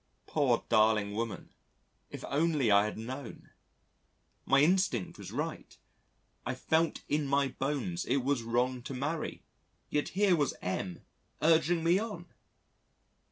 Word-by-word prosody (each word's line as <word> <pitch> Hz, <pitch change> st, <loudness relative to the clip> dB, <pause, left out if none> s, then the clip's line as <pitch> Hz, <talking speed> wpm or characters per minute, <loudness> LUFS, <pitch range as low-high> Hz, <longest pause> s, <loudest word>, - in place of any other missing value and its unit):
Poor -, -, +1 dB
darling 110 Hz, -2 st, +3 dB
woman 115 Hz, 0 st, -4 dB, 0.6 s
if -, -, -7 dB
only 145 Hz, -5 st, +2 dB
I 100 Hz, +1 st, +6 dB
had 105 Hz, -, -4 dB
known! 125 Hz, +3 st, -7 dB, 1.0 s
My 135 Hz, 0 st, +5 dB
instinct 170 Hz, -, +1 dB
was -, -, -8 dB
right -, -, -5 dB, 0.7 s
I -, -, -3 dB
felt 160 Hz, +1 st, 0 dB
in 150 Hz, -1 st, 0 dB
my 140 Hz, 0 st, +2 dB
bones 150 Hz, +7 st, -2 dB
it 130 Hz, 0 st, +1 dB
was 135 Hz, -2 st, +1 dB
wrong 125 Hz, +2 st, 0 dB
to 130 Hz, +2 st, -6 dB
marry, 150 Hz, +5 st, -3 dB, 0.5 s
yet 150 Hz, -, 0 dB
here 200 Hz, -3 st, +5 dB
was 145 Hz, -4 st, 0 dB
M 90 Hz, -1 st, -3 dB, 0.4 s
urging 165 Hz, +1 st, +3 dB
me 170 Hz, +3 st, +4 dB
on. 205 Hz, -6 st, -5 dB
140 Hz, 130 wpm, -31 LUFS, 115-165 Hz, 1.0 s, I